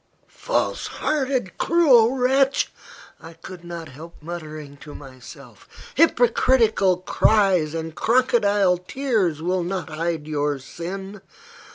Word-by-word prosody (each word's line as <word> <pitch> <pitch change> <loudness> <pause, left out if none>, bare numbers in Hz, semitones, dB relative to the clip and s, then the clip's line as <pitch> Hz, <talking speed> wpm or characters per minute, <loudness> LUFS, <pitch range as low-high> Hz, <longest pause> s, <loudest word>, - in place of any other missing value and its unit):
"False - - -2
hearted, 265 -8 -2
cruel 265 -8 +4
wretch!" 270 +2 +1 0.5
I 165 +1 -11
could 180 +1 -12
not 170 -2 -8
help 160 +6 -12
muttering 155 -3 -8
to 145 +1 -12
myself. 130 -3 -13 0.2
"Hypocritical 235 - +3
cries 185 -4 +2
and 160 0 -5
crocodile 205 -5 +2
tears 190 - -1
will 180 +1 0
not 180 0 -4
hide 160 -1 -3
your 145 -1 -1
sin. 190 +8 -8
180 Hz, 105 wpm, -22 LUFS, 160-235 Hz, 0.5 s, cruel